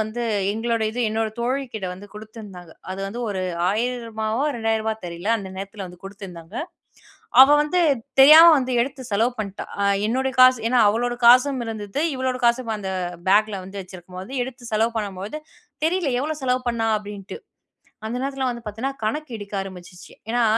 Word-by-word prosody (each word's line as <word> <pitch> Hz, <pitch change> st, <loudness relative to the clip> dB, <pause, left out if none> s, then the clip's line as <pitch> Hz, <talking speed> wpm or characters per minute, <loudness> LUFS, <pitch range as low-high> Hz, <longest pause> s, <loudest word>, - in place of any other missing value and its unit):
வந்து, 220 Hz, +3 st, -3 dB, 0.3 s
எங்களோட 230 Hz, +1 st, -1 dB
இது 240 Hz, +3 st, -4 dB
என்னோட 220 Hz, 0 st, -1 dB
தோழி 255 Hz, +4 st, -1 dB
கிட்ட 195 Hz, -4 st, -3 dB
வந்து 190 Hz, +3 st, -11 dB
குடுத்துருந்தாங்க. 210 Hz, -6 st, -11 dB, 0.2 s
அது 190 Hz, -, -6 dB
வந்து 230 Hz, +5 st, -6 dB
ஒரு 190 Hz, -2 st, -3 dB, 0.3 s
ரூ.1,000வோ 225 Hz, +1 st, -2 dB
ரூ.2,000வோ 220 Hz, -1 st, -1 dB
தெரியல. 175 Hz, +3 st, -5 dB
அந்த 195 Hz, -3 st, -7 dB
நேரத்தில் 195 Hz, +1 st, -6 dB
வந்து 180 Hz, 0 st, -13 dB
குடுத்துருந்தாங்க. 195 Hz, -3 st, -10 dB, 0.9 s
அவ 270 Hz, -, +10 dB
வந்து 330 Hz, +5 st, 0 dB, 0.4 s
தெரியாம 315 Hz, +4 st, +10 dB
வந்து 255 Hz, -1 st, -1 dB
எடுத்து 265 Hz, 0 st, -7 dB
செலவு 225 Hz, +5 st, +2 dB
பண்ணிட்டா. 200 Hz, -2 st, -5 dB, 0.2 s
அ 200 Hz, -, +2 dB, 0.2 s
என்னுடைய 260 Hz, +3 st, -1 dB
காசு, 255 Hz, -2 st, +7 dB
ஏன்னா 250 Hz, -1 st, +4 dB
அவளுடைய 240 Hz, +3 st, -1 dB
காசும் 255 Hz, +1 st, +6 dB
இருந்தது. 215 Hz, +3 st, -4 dB, 0.2 s
இவளோட 260 Hz, -1 st, -2 dB
காசும் 235 Hz, -1 st, +1 dB
அந்த 190 Hz, -2 st, -4 dB, 0.4 s
பேக்ல 205 Hz, -1 st, +3 dB
வந்து 195 Hz, +1 st, -7 dB
வச்சுருக்கும் 180 Hz, 0 st, -11 dB
போது, 210 Hz, -, -10 dB
எடுத்து 245 Hz, -2 st, -9 dB
செலவு 225 Hz, +2 st, +1 dB
பண்ணும்போது, 205 Hz, +6 st, -5 dB, 0.5 s
"தெரியல. 335 Hz, -5 st, 0 dB
எவ்வளோ 310 Hz, +2 st, -2 dB
செலவு 255 Hz, 0 st, +1 dB
பண்ணா?" 225 Hz, -1 st, -1 dB
அப்படின்டு. 205 Hz, -, -8 dB, 0.7 s
அந்த 230 Hz, +3 st, -3 dB
நேரத்துல 270 Hz, -1 st, -2 dB
வந்து 240 Hz, -1 st, -5 dB
பாத்தீங்கன்னா, 225 Hz, +6 st, -4 dB
கணக்கு 295 Hz, +5 st, -3 dB
இடிக்க 205 Hz, 0 st, -10 dB
ஆரம்பிச்சுச்சு. 180 Hz, -2 st, -11 dB, 0.2 s
ஏன்னா 240 Hz, +1 st, +2 dB
225 Hz, 160 wpm, -23 LUFS, 200-250 Hz, 0.9 s, அவ